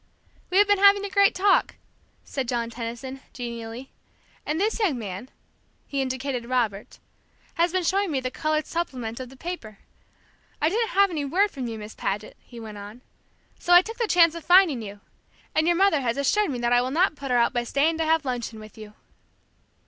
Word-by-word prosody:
"We 370 Hz, -, +1 dB
have 410 Hz, -, +7 dB
been 410 Hz, -1 st, +3 dB
having 400 Hz, 0 st, +6 dB
a 400 Hz, -, -6 dB
great 400 Hz, +1 st, +4 dB
talk," 395 Hz, +2 st, +2 dB, 0.5 s
said 265 Hz, -3 st, -4 dB
John 235 Hz, -1 st, -2 dB
Tenison, 240 Hz, +3 st, -6 dB
genially, 235 Hz, +1 st, -7 dB, 0.6 s
"and 305 Hz, +2 st, -1 dB
this 430 Hz, +4 st, 0 dB
young 365 Hz, -, +1 dB
man 205 Hz, +2 st, -7 dB, 0.3 s
" -, -, -41 dB
he 280 Hz, -1 st, -2 dB
indicated 260 Hz, -2 st, -3 dB
Robert, 225 Hz, -6 st, -1 dB, 0.6 s
"has 340 Hz, +1 st, +1 dB
been 370 Hz, 0 st, 0 dB
showing 390 Hz, +3 st, +1 dB
me 280 Hz, -4 st, 0 dB
the 255 Hz, -1 st, -4 dB
colored 310 Hz, +2 st, -1 dB
supplement 255 Hz, -9 st, -4 dB
of 255 Hz, -1 st, -7 dB
the 265 Hz, -, -15 dB
paper. 255 Hz, -, -7 dB, 0.8 s
I 310 Hz, -, +2 dB
didn't 450 Hz, +5 st, 0 dB
have 400 Hz, -1 st, +5 dB
any 305 Hz, -4 st, -2 dB
word 375 Hz, +9 st, +1 dB
from 260 Hz, -4 st, -5 dB
you, 225 Hz, -1 st, -5 dB
Miss 210 Hz, 0 st, -9 dB
Paget," 205 Hz, +2 st, -4 dB
he 240 Hz, -, -13 dB
went 215 Hz, -2 st, -9 dB
on, 205 Hz, +4 st, -10 dB, 0.6 s
"so 350 Hz, -, +2 dB
I 355 Hz, -, +8 dB
took 450 Hz, +3 st, -8 dB
the 465 Hz, -, 0 dB
chance 335 Hz, -4 st, +5 dB
of 335 Hz, -1 st, -8 dB
finding 350 Hz, -7 st, +5 dB
you. 205 Hz, -1 st, -9 dB, 0.5 s
And 315 Hz, +1 st, +2 dB
your 345 Hz, -, +3 dB
mother 375 Hz, -5 st, +3 dB
has 235 Hz, -1 st, -1 dB
assured 400 Hz, +9 st, +1 dB
me 260 Hz, -, -3 dB
that 240 Hz, 0 st, +1 dB
I 245 Hz, -, +5 dB
will 255 Hz, -, -2 dB
not 330 Hz, +4 st, +2 dB
put 280 Hz, -2 st, -7 dB
her 250 Hz, -, +3 dB
out 235 Hz, -, +2 dB
by 240 Hz, -, 0 dB
staying 310 Hz, +7 st, +1 dB
to 325 Hz, -, +1 dB
have 320 Hz, -1 st, +2 dB
luncheon 240 Hz, -3 st, -4 dB
with 215 Hz, 0 st, -13 dB
you." 210 Hz, -1 st, -11 dB
270 Hz, 210 wpm, -25 LUFS, 235-350 Hz, 0.8 s, I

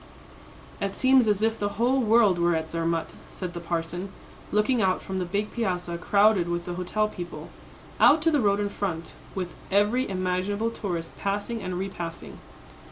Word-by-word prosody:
"It 200 Hz, 0 st, -2 dB
seems 260 Hz, -2 st, +4 dB
as 210 Hz, 0 st, +2 dB
if 225 Hz, 0 st, +1 dB
the 205 Hz, 0 st, -1 dB
whole 250 Hz, +4 st, +3 dB
world 215 Hz, -5 st, +4 dB
were 170 Hz, 0 st, +3 dB
at 160 Hz, 0 st, -3 dB
Zermatt," 165 Hz, 0 st, -1 dB, 0.2 s
said 180 Hz, -2 st, -6 dB
the 175 Hz, -, -5 dB
parson, 170 Hz, +2 st, -3 dB, 0.4 s
looking 215 Hz, +3 st, +2 dB
out 185 Hz, -2 st, +2 dB
from 190 Hz, 0 st, -3 dB
the 180 Hz, -, -1 dB
big 205 Hz, +4 st, -2 dB
piazza 180 Hz, -6 st, -2 dB
crowded 200 Hz, -2 st, +3 dB
with 175 Hz, 0 st, -2 dB
the 175 Hz, -, -4 dB
hotel 185 Hz, +4 st, 0 dB
people, 175 Hz, -4 st, -8 dB, 0.5 s
out 305 Hz, -, +7 dB
to 325 Hz, -, +4 dB
the 295 Hz, -3 st, +3 dB
road 200 Hz, -2 st, +3 dB
in 205 Hz, 0 st, 0 dB
front, 170 Hz, -5 st, -4 dB, 0.2 s
with 180 Hz, -2 st, -3 dB, 0.2 s
every 210 Hz, +6 st, +2 dB
imaginable 190 Hz, +4 st, -1 dB
tourist 175 Hz, -7 st, -4 dB
passing 205 Hz, +3 st, -2 dB
and 185 Hz, -2 st, -3 dB
repassing. 175 Hz, -3 st, -6 dB
195 Hz, 170 wpm, -26 LUFS, 175-215 Hz, 0.5 s, out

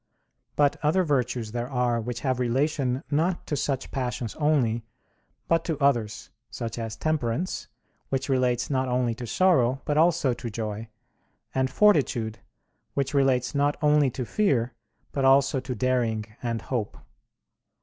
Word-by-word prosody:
But 145 Hz, -1 st, +3 dB
other 160 Hz, +5 st, +3 dB
virtues 125 Hz, -7 st, -1 dB
there 120 Hz, +1 st, -3 dB
are 125 Hz, -3 st, +1 dB
which 120 Hz, 0 st, -5 dB
have 130 Hz, -2 st, 0 dB
relation 130 Hz, +2 st, 0 dB
not 170 Hz, +5 st, +1 dB
to 150 Hz, -, -2 dB
such 135 Hz, -1 st, -2 dB
passions 125 Hz, -4 st, -3 dB
only, 130 Hz, -7 st, +2 dB, 0.6 s
but 165 Hz, 0 st, +2 dB
to 160 Hz, -4 st, -1 dB
others; 120 Hz, -7 st, 0 dB, 0.2 s
such 115 Hz, 0 st, -5 dB
as 115 Hz, -1 st, -4 dB
temperance, 155 Hz, +2 st, -1 dB, 0.4 s
which 135 Hz, -1 st, -1 dB
relates 125 Hz, -2 st, +1 dB
not 130 Hz, -1 st, +1 dB
only 125 Hz, -1 st, +1 dB
to 120 Hz, +1 st, -7 dB
sorrow, 135 Hz, -, +3 dB
but 150 Hz, 0 st, +1 dB
also 165 Hz, -5 st, +3 dB
to 120 Hz, 0 st, -6 dB
joy; 110 Hz, 0 st, -4 dB, 0.7 s
and 130 Hz, 0 st, +1 dB
fortitude, 130 Hz, -, +2 dB, 0.6 s
which 140 Hz, 0 st, -1 dB
relates 135 Hz, -3 st, +2 dB
not 145 Hz, 0 st, +1 dB
only 150 Hz, -2 st, +4 dB
to 125 Hz, 0 st, -4 dB
fear, 125 Hz, -, +1 dB, 0.4 s
but 135 Hz, -, -1 dB
also 135 Hz, 0 st, +4 dB
to 125 Hz, 0 st, -5 dB
daring 115 Hz, -2 st, 0 dB, 0.2 s
and 115 Hz, -3 st, -2 dB
hope. 120 Hz, -6 st, -3 dB
130 Hz, 145 wpm, -26 LUFS, 120-145 Hz, 0.7 s, only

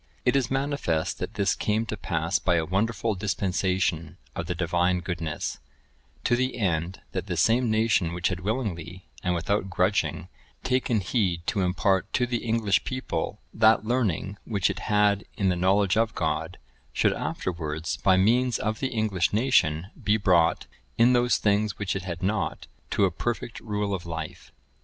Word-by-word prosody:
(992) -, -, +5 dB
It -, -, +2 dB
is 125 Hz, -, -3 dB
manifest 135 Hz, -, -1 dB
that 90 Hz, -, -4 dB
this 100 Hz, -3 st, +2 dB
came 110 Hz, +2 st, 0 dB
to 110 Hz, -, -4 dB
pass 85 Hz, -4 st, -1 dB
by 90 Hz, -, +2 dB
a 80 Hz, -1 st, +1 dB
wonderful 110 Hz, +5 st, 0 dB
dispensation 95 Hz, -4 st, -1 dB, 0.2 s
of -, -, -4 dB
the 90 Hz, -, -2 dB
Divine 90 Hz, +1 st, +1 dB
goodness; 85 Hz, -4 st, -4 dB, 0.6 s
to 120 Hz, -, +3 dB
the 130 Hz, 0 st, -1 dB
end, 90 Hz, -4 st, -1 dB
that -, -, -4 dB
the -, -, -2 dB
same 120 Hz, +1 st, +3 dB
nation 110 Hz, -6 st, +2 dB
which 85 Hz, +1 st, 0 dB
had 90 Hz, -1 st, -3 dB
willingly, 95 Hz, -5 st, -3 dB, 0.2 s
and 90 Hz, -1 st, +1 dB
without 95 Hz, +4 st, -1 dB
grudging, 95 Hz, +2 st, 0 dB, 0.4 s
taken 125 Hz, -4 st, +1 dB
heed 90 Hz, -5 st, 0 dB
to 100 Hz, -, 0 dB
impart 95 Hz, +1 st, +1 dB
to 125 Hz, -, +2 dB
the 120 Hz, 0 st, -1 dB
English 110 Hz, -4 st, +1 dB
people 130 Hz, 0 st, -3 dB
that 110 Hz, -1 st, +4 dB
learning 105 Hz, -5 st, -1 dB
which 100 Hz, -3 st, 0 dB
it 100 Hz, -, -6 dB
had 105 Hz, -1 st, +3 dB
in 95 Hz, -2 st, +2 dB
the 90 Hz, -, +2 dB
knowledge 95 Hz, +2 st, +2 dB
of 115 Hz, 0 st, +1 dB
God, -, -, -2 dB, 0.3 s
should -, -, +2 dB
afterwards, 80 Hz, -2 st, -3 dB
by 95 Hz, -1 st, +3 dB
means 120 Hz, +5 st, +3 dB
of 110 Hz, +1 st, -2 dB
the 135 Hz, -, 0 dB
English 110 Hz, -8 st, 0 dB
nation, 95 Hz, -, +2 dB
be 105 Hz, +1 st, +3 dB
brought, 90 Hz, -5 st, +3 dB, 0.3 s
in 120 Hz, +2 st, +5 dB
those 120 Hz, 0 st, +3 dB
things 105 Hz, 0 st, +1 dB
which 100 Hz, -2 st, -2 dB
it 95 Hz, -, -2 dB
had 90 Hz, 0 st, -6 dB
not, 105 Hz, +2 st, -1 dB, 0.2 s
to 100 Hz, -, +3 dB
a 95 Hz, -, +1 dB
perfect 120 Hz, +5 st, -3 dB
rule 105 Hz, -2 st, -2 dB
of 85 Hz, -2 st, -4 dB
life. 80 Hz, -1 st, -6 dB
100 Hz, 170 wpm, -26 LUFS, 90-110 Hz, 0.6 s, 992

